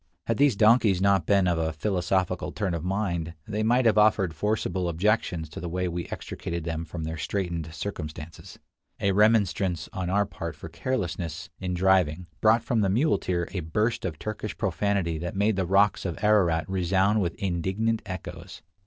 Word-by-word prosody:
Had 115 - 0
these 140 -5 +4
donkeys 105 -3 +4
not 95 -3 +2
been 100 -2 +4
of 85 -2 +1
a 80 0 0
philosophical 90 +2 -1
turn 100 -5 -2
of 80 -2 -3
mind, 90 -4 -2
they 105 0 -2
might 120 +3 +3
have 110 -2 +5
offered 105 -5 +3
forcible 95 0 -1
objections 85 -2 0
to - - -8
the 85 - -5
way 90 +2 -1
we 85 0 -4
extricated 85 -1 -5
them 80 0 -3
from 80 0 -6
their 80 +1 -4
straightened 85 -1 -3
circumstances. 80 -1 -7 0.4
A 100 - +2
remonstrance 95 -5 +2
on 95 -4 -3
our 100 +2 +2
part - - -6
for - - -9
carelessness 90 -9 -3
in 90 -1 -2
driving 90 -2 +2 0.2
brought 110 +1 +4
from 115 -2 +1
the 100 - +2
muleteer 95 - +1
a 95 - -3
burst 105 +8 -1
of 85 -5 -3
Turkish 110 +3 -5
profanity 95 -3 0
that 85 +2 -5
made 105 +2 +2
the 95 -2 -1
rocks 100 +3 +3
of 90 -3 -3
Ararat 85 -7 +3
resound 95 +3 +2
with 85 -3 -1
indignant 95 +5 -1
echoes. 95 -4 -8
95 Hz, 175 wpm, -26 LUFS, 85-105 Hz, 0.4 s, have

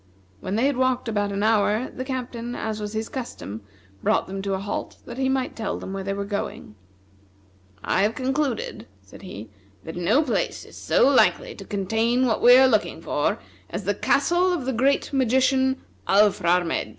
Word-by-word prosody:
When 190 - -3
they 230 +4 +2
had 280 -2 +1
walked 255 -1 +1
about 205 -2 -1
an 200 +1 -2
hour, 215 +2 +2
the 255 - -5
Captain, 245 -2 -5
as 220 -1 -3
was 210 0 -5
his 220 +1 -2
custom, 110 - -6 0.4
brought - - +2
them 195 0 -5
to 195 0 -1
a - - -3
halt 200 +1 -5
that 240 +2 -8
he 265 0 +1
might 265 -1 -1
tell 220 -3 -3
them 190 - -7
where 195 0 -4
they 195 +1 -2
were 200 0 -3
going. 200 - -5 1.1
"I - - +1
have 210 +3 +1
concluded," 290 - -2 0.2
said - - -15
he, 110 - -9 0.3
"that 160 - -7
no 200 - +2
place 255 - -2
is - - -15
so - - +3
likely - - +3
to - - -11
contain 225 +5 0
what 225 -3 0
we 245 +1 +8
are 265 0 +7
looking 215 -5 +1
for - - -1 0.3
as - - -5
the - - 0
castle 360 +2 +2
of 335 -8 -2
the 265 - -1
great 270 +5 +1
magician, 265 +1 +2 0.3
Alfrarmedj. 180 -4 +2
230 Hz, 185 wpm, -24 LUFS, 200-260 Hz, 1.1 s, we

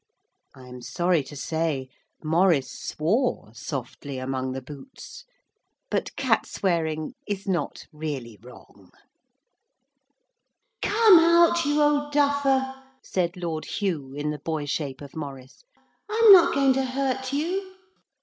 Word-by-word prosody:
I 130 -1 -14
am 125 0 -10
sorry 175 +3 +1
to 145 - -10
say 155 -2 -2 0.4
Maurice 160 -2 +2
swore 185 - -1
softly 135 +2 -6
among 130 0 -3
the 135 - -5
boots, 140 0 -11 0.7
but - - -2
cat - - +1
swearing 160 -1 -1
is 205 -1 -4
not 185 -3 -2
really 140 -8 -6
wrong. 125 +2 -16 1.9
'Come 425 -4 +6
out, 340 0 +4
you 295 +1 +1
old 290 0 +2
duffer,' 280 -2 +2 0.3
said 180 -1 -2
Lord 165 -3 -4
Hugh 155 -10 -3
in 150 +1 -2
the 150 - -6
boy 155 0 -3
shape 140 -2 -3
of 140 -2 -11
Maurice. 135 - -8 0.5
'I'm 440 -1 +8
not 350 -2 +6
going 275 -1 +4
to 270 +1 0
hurt 260 0 -2
you.' 375 +7 -2
170 Hz, 125 wpm, -25 LUFS, -, 1.9 s, I'm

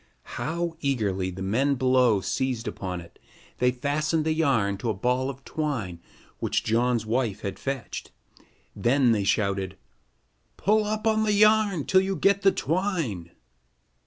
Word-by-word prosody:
How 165 +5 -2
eagerly 105 -9 0
the 95 +1 -6
men 130 +9 +1
below 125 -5 +3
seized 125 +4 -2
upon 90 -2 -4
it. 85 - -16 0.4
They 125 - +4
fastened 150 +5 -1
the 160 - +2
yarn 130 -11 +1
to 120 - -2
a 110 - 0
ball 125 +6 0
of 135 0 -9
twine 120 - -3 0.4
which - - 0
John's 115 0 +1
wife 115 -2 -1
had 100 -1 -5
fetched. 135 -5 -5 0.7
Then 125 0 +3
they 105 -3 +1
shouted: 100 -2 0 0.8
"Pull 215 +2 +2
up 215 +1 -2
the 220 -1 +2
yarn 210 -5 +4
till 190 - +4
you 190 0 -1
get 200 +4 +2
the 195 0 +5
twine." 160 - -2
130 Hz, 145 wpm, -26 LUFS, 105-165 Hz, 0.8 s, the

